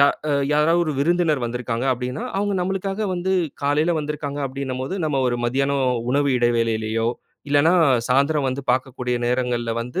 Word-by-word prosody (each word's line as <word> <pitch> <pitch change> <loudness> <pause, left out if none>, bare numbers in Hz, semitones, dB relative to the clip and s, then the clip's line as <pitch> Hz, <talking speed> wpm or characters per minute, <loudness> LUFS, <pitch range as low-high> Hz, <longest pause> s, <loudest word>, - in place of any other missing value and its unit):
யா 140 - +7 0.5
யாராவது 160 +3 +3
ஒரு 155 - -1
விருந்தினர் 160 -4 +2
வந்திருக்காங்க 120 0 -3
அப்டின்னா, 125 - -4
அவங்க 205 0 0
நம்மளுக்காக 195 +2 -2
வந்து 180 +2 -1 0.3
காலையில 150 +4 +2
வந்திருக்காங்க 145 -1 -4
அப்டினும்போது, 130 +3 -4
நம்ம 140 -3 0
ஒரு 120 - 0
மதியானம் 135 +2 +1 0.3
உணவு 140 0 +2
இடைவேளையிலயோ, 115 -1 +1 0.4
இல்லைனா 145 +4 +4 0.4
சாய்ந்திரம் 140 +2 +2
வந்து 135 +2 -4
பாக்கக்கூடிய 125 -1 -2
நேரங்கள்ல 120 -2 0
வந்து 125 +1 -4
140 Hz, 140 wpm, -22 LUFS, 125-155 Hz, 0.5 s, யா